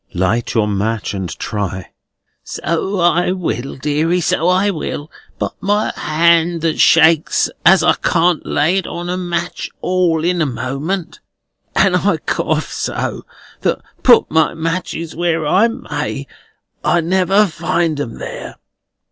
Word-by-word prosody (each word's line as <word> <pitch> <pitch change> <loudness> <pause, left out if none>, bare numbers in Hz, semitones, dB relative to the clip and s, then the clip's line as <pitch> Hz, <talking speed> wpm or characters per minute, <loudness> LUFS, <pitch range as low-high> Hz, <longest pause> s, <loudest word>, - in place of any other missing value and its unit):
"Light 100 +6 0
your 110 -2 +2
match, 105 +2 -2
and 95 -3 -4
try." 95 -3 -4 0.5
"So 175 +5 -2
I 175 +1 +2
will, 150 -8 -3
deary, 150 +5 0
so 165 0 +1
I 190 +3 +3
will; 155 -3 -5 0.3
but - - -3
my 205 +2 0
hand 170 +1 +2
that 160 -1 -1
shakes, 160 -1 +4
as 190 +2 +6
I - - +5
can't 175 -1 +1
lay 160 +6 +1
it 190 - -2
on 175 0 -5
a - - -1
match 175 -1 -3
all 180 -3 +1
in 175 0 +1
a - - +3
moment. 135 +9 -4 0.6
And - - +4
I - - +1
cough - - -2
so, - - -3 0.3
that, - - +1 0.2
put 240 -3 +5
my 160 +1 +2
matches 165 0 -3
where 165 -1 0
I 190 +9 +4
may, 145 -9 -4 0.6
I 175 - +3
never 190 +4 +3
find 165 -3 -1
'em 120 -6 -4
there. - - -7
165 Hz, 140 wpm, -17 LUFS, 145-180 Hz, 0.6 s, as